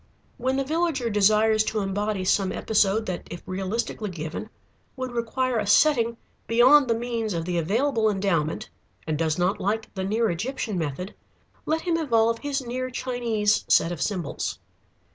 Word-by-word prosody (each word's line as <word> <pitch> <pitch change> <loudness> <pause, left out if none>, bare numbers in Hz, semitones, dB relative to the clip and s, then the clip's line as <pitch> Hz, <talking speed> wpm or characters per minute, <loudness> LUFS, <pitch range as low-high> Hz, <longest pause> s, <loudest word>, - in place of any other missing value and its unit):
When 260 +2 0
the 275 - +1
villager 300 -5 0
desires 215 +2 +4
to 215 -1 -1
embody 200 0 -2
some 190 0 +2
episode 215 0 +1
that 185 -3 -5
if 175 - -8
realistically 200 +3 -3
given 160 -3 -6 0.5
would 255 -1 -4
require 240 +1 -1
a 210 - -2
setting 235 0 +4 0.3
beyond 255 +5 +6
the 230 - +2
means 230 -4 -2
of 165 -1 -2
the 175 -1 0
available 220 - +1
endowment, 190 -6 -1 0.3
and 155 - -1
does 160 0 0
not 180 +4 0
like 220 +3 -2
the 190 - -3
near 220 +3 +1
Egyptian 220 +4 -3
method, 165 +5 -4 0.5
let 320 +1 +1
him 340 -1 0
evolve 230 -7 +2
his 280 -2 -3
near 255 +2 -3
Chinese 235 -5 0
set 165 - +4
of 170 -5 -5
symbols. 180 -5 -2
220 Hz, 160 wpm, -25 LUFS, 190-245 Hz, 0.5 s, beyond